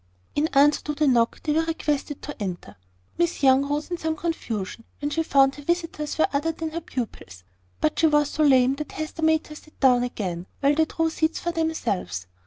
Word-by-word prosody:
In 295 Hz, +2 st, +1 dB
answer 290 Hz, +1 st, +5 dB
to 300 Hz, -, -2 dB
the 305 Hz, -, +1 dB
knock, 235 Hz, -3 st, +2 dB
they 300 Hz, -, +1 dB
were 320 Hz, -, +3 dB
requested 300 Hz, -3 st, -2 dB
to 295 Hz, -6 st, -7 dB
enter. 180 Hz, -, -5 dB, 0.4 s
Miss 345 Hz, -3 st, 0 dB
Young 270 Hz, +1 st, +5 dB
rose 295 Hz, +4 st, -2 dB
in 350 Hz, -, -1 dB
some 320 Hz, 0 st, -1 dB
confusion 230 Hz, -, -4 dB, 0.2 s
when 290 Hz, 0 st, -2 dB
she 325 Hz, -, +1 dB
found 275 Hz, -3 st, +4 dB
her 290 Hz, -, -10 dB
visitors 330 Hz, -1 st, -2 dB
were 315 Hz, -, +4 dB
other 295 Hz, +4 st, +1 dB
than 320 Hz, 0 st, -5 dB
her 335 Hz, +2 st, -4 dB
pupils: 210 Hz, -, -6 dB, 0.4 s
but 155 Hz, -, 0 dB
she 325 Hz, -, +5 dB
was 295 Hz, -1 st, +2 dB
so 310 Hz, -, -2 dB
lame 265 Hz, -3 st, +5 dB
that 300 Hz, -, -6 dB
Hester 310 Hz, +1 st, -5 dB
made 315 Hz, 0 st, +3 dB
her 305 Hz, -, -10 dB
sit 310 Hz, 0 st, -16 dB
down 250 Hz, -3 st, +5 dB
again, 190 Hz, -8 st, -4 dB
while 280 Hz, +1 st, +3 dB
they 315 Hz, +2 st, +3 dB
drew 325 Hz, +1 st, -1 dB
seats 320 Hz, 0 st, 0 dB
for 345 Hz, -, -2 dB
themselves. 230 Hz, -, -2 dB
295 Hz, 210 wpm, -25 LUFS, 255-320 Hz, 0.4 s, answer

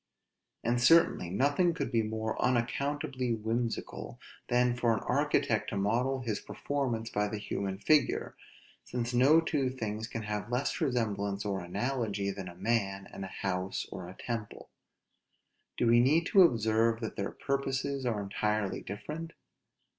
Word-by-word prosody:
And 120 Hz, +1 st, +1 dB
certainly 165 Hz, -, +5 dB
nothing 145 Hz, -, +2 dB
could 140 Hz, -6 st, -3 dB
he 115 Hz, -2 st, +3 dB
more 110 Hz, 0 st, -2 dB
unaccountably 130 Hz, 0 st, 0 dB
whimsical, 115 Hz, +2 st, -3 dB, 0.3 s
than 125 Hz, 0 st, +3 dB
for 120 Hz, -2 st, +2 dB
an -, -, -3 dB
architect -, -, +1 dB
to -, -, -3 dB
model 120 Hz, +7 st, +1 dB
his 115 Hz, -4 st, -2 dB
performance 125 Hz, -6 st, -3 dB
by 105 Hz, 0 st, +1 dB
the 105 Hz, +1 st, -4 dB
human 100 Hz, -2 st, -3 dB
figure, 150 Hz, +9 st, +2 dB, 0.5 s
since 125 Hz, 0 st, -3 dB
no 135 Hz, +6 st, +6 dB
two 145 Hz, -5 st, 0 dB
things 110 Hz, -3 st, -4 dB
can 115 Hz, -1 st, -5 dB
have 105 Hz, +1 st, -3 dB
less 125 Hz, +3 st, -1 dB
resemblance 100 Hz, -5 st, -1 dB
or 100 Hz, -2 st, -1 dB
analogy, 100 Hz, +1 st, -2 dB
than 95 Hz, -1 st, -6 dB
a 85 Hz, -, -9 dB
man, 95 Hz, -1 st, -1 dB
and 95 Hz, -, -6 dB
a -, -, -4 dB, 0.2 s
house 95 Hz, 0 st, -1 dB
or 90 Hz, -1 st, -7 dB
temple: 115 Hz, -3 st, -5 dB, 1.1 s
do -, -, +1 dB
we 120 Hz, 0 st, +6 dB
need 150 Hz, +7 st, +4 dB
to 195 Hz, +2 st, +6 dB
observe 115 Hz, -, +3 dB
that 110 Hz, -, -4 dB
their 100 Hz, -, -2 dB
purposes 140 Hz, 0 st, -2 dB
are 110 Hz, -5 st, -1 dB
entirely 100 Hz, 0 st, -1 dB
different? 155 Hz, -, -6 dB
115 Hz, 145 wpm, -31 LUFS, 105-130 Hz, 1.1 s, no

